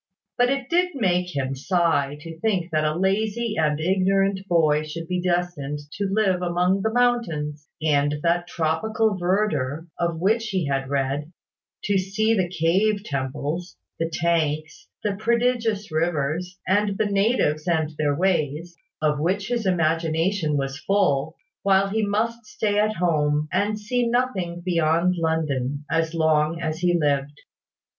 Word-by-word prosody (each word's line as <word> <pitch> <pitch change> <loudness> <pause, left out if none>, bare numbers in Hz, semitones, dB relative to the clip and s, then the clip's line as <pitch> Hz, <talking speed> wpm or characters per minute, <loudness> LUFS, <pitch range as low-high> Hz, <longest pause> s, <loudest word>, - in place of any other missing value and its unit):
But 245 0 +3
it 270 -2 -1
did 360 +1 +1
make 180 - 0
him 135 -1 -1
sigh 145 -1 +1
to 165 0 -9
think 185 -4 0
that 155 -1 +1
a 155 0 0
lazy 215 +5 0
and 150 -2 +1
ignorant 190 +3 +2
boy 155 -4 +3
should 160 +2 -6
be 180 +1 -1
destined 175 -5 -1 0.2
to 200 -1 0
live 195 -3 +2
among 180 +2 +1
those 220 - 0
mountains, 170 -12 0 0.2
and 145 -1 +2
that 175 +1 +1
tropical 200 +7 0
verdure 175 -6 0
of 170 -2 -1
which 220 +5 +1
he 190 -5 -1
had 135 -1 -1
read, 140 +2 -1 0.5
to 200 -1 +2
see 215 +4 +1
the 185 -5 +1
cave 190 +5 +1
temples, 145 +3 -4 0.2
the 165 0 0
tanks, 155 -2 -1 0.2
the 205 -2 -1
prodigious 230 -3 0
rivers, 160 +2 -1
and 200 +1 +2
the 215 - +1
natives 200 -6 +1
and 160 -3 +1
their 145 -2 +1
ways, 170 -1 0 0.3
of 150 -1 +2
which 195 +7 -1
his 235 -4 -1
imagination 165 -1 +1
was 135 0 -3
full, 160 -6 +1 0.3
while 195 0 +3
he 220 +2 0
must 225 +3 -1
stay 210 -1 0
at 215 +1 +1
home, 150 -3 +1
and 210 +1 +1
see 240 +3 -1
nothing 205 -8 -1
beyond 170 0 +2
London, 150 -4 -1
as 165 0 0
long 160 0 +2
as 160 -1 -3
he 175 -1 +2
lived. 145 -1 0
175 Hz, 150 wpm, -24 LUFS, 155-205 Hz, 0.5 s, But